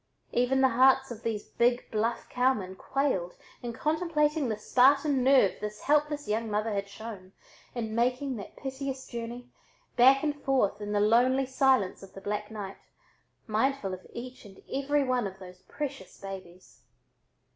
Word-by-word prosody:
Even 250 +2 +2
the 265 - +5
hearts 265 +2 +4
of 230 -2 -7
these 220 -3 -2
big 240 +1 +1
bluff 225 +2 -1
cowmen 245 -7 0
quailed 190 -9 -1 0.3
in 240 - -4
contemplating 300 0 0
the 215 - -1
Spartan 270 +4 +3
nerve 260 -7 +5
this 210 0 -5
helpless 295 0 +1
young 220 +2 -1
mother 210 +1 -1
had 200 0 -2
shown 200 -2 -9 0.4
in 225 -2 -3
making 250 +3 0
that 200 - -9
piteous 270 0 -5
journey, 240 +1 -7 0.5
back 265 +3 +6
and 290 -1 -2
forth 250 -7 +1
in 205 0 -4
the 205 - +2
lonely 245 +5 +4
silence 260 -6 +2
of 195 - -13
the 195 - -9
black 210 +1 -3
night, 205 -3 -7 0.7
mindful 220 -2 0
of 185 - -9
each 250 +2 -8
and 195 -3 -15
every 280 +1 +1
one 250 -4 0
of 190 0 -9
those 185 -1 -12
precious 275 -10 -6
babies. 185 -2 -10
240 Hz, 155 wpm, -29 LUFS, 210-270 Hz, 0.7 s, back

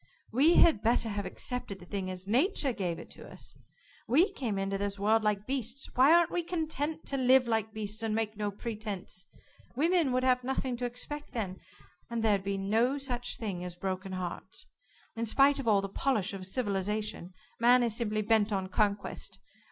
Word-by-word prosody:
We 285 +9 +5
had 315 -11 +6
better 230 0 +2
have 205 -2 -3
accepted 230 0 -3
the 175 - -13
thing 190 0 -3
as 185 0 -6
Nature 270 - +2
gave 180 -6 -2
it - - -11
to - - -11
us. - - -9 0.5
We 330 - +4
came 235 - -3
into 195 0 -1
this 200 0 -2
world 215 +3 +3
like 210 -1 0
beasts 260 0 -2
why 265 +4 +6
aren't 340 -1 +5
we 350 - 0
content 320 -2 -3
to 275 - -2
live 260 -1 +5
like 220 -1 0
beasts, 215 0 -3
and 220 -1 0
make 220 -1 -1
no 210 0 -2
pretenses? 205 -4 -5 0.5
Women 325 0 +2
would 255 0 +1
have 250 -1 +3
nothing 260 0 -2
to 245 - -2
expect 285 +5 -5
then, 195 -6 -3 0.5
and 235 -1 -2
there'd 205 -3 +2
be 200 0 -2
no 225 +8 +1
such 250 -3 -2
thing 195 -6 -4
as 180 -1 -5
broken 190 +1 -4
hearts. 180 -2 -5 0.5
In 230 0 -2
spite 275 +5 +4
of 265 - -4
all 205 -3 +4
the 195 - -3
polish 205 -1 0
of 185 -1 -7
civilization, 205 -3 -2 0.3
man 245 +1 +5
is 230 -3 0
simply 215 -2 -1
bent 220 0 +3
on 190 -2 -1
conquest. 205 0 -1
220 Hz, 190 wpm, -30 LUFS, 200-255 Hz, 0.5 s, had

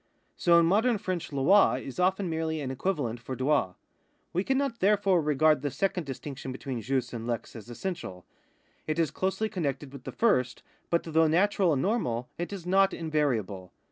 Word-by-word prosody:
So 170 -1 +4
in 170 - +5
modern 220 +7 +3
French 185 -3 -4
Ini 150 +9 +4
is 135 +5 -8
often 185 +1 +1
merely 160 -1 -2
an 135 -3 -3
equivalent 130 -5 -2
for 125 +2 -6
droil. 130 -8 +1 0.6
We 180 +3 +1
cannot 265 0 0
therefore 195 -2 +3
regard 150 -1 +3
the 145 - -1
second 180 0 -2
distinction 135 0 -6
between 130 -2 -5
jus 130 -1 -2
and 115 -1 -5
lex 120 -2 -4
as 115 0 -10
essential. 120 - -6 0.6
It 155 0 -1
is 165 -3 +1
closely 190 +6 -1
connected 145 -9 -3
witli 135 -2 -11
the - - -5
lirsl, 165 - +1 0.3
but, 170 - +1
though 160 0 +3
natural 185 +2 +3
and 135 -3 +1
normal, 125 - -1
it 175 - -3
is 195 -4 -7
not 195 +2 +3
invariable. 120 - -2
155 Hz, 175 wpm, -28 LUFS, 130-190 Hz, 0.6 s, in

